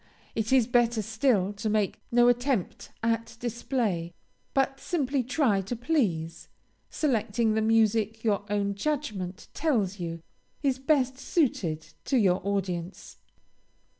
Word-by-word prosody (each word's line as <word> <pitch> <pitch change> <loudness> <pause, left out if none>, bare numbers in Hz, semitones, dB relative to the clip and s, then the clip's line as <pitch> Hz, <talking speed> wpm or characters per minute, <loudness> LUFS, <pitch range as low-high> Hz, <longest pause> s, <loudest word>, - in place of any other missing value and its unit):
It 220 +1 -2
is 260 -3 +5
better 240 -2 +2
still 215 -3 +1
to 205 +2 -3
make 210 -2 0
no 240 0 +5
attempt 245 -4 0
at 230 0 -1
display, 230 -8 -2 0.4
but 270 0 +1
simply 280 -4 0
try 245 -5 +1
to 195 +6 -4
please, 215 - -1 0.4
selecting 230 -5 +1
the 220 - +1
music 220 0 +2
your 205 -3 +1
own 200 -1 0
judgment 205 -7 -3
tells 215 - 0
you 165 -1 -5 0.4
is 265 -2 +1
best 265 -2 +1
suited 200 - -1
to 270 - +2
your 190 -5 +3
audience. 185 -3 -3
225 Hz, 125 wpm, -28 LUFS, 200-260 Hz, 0.4 s, is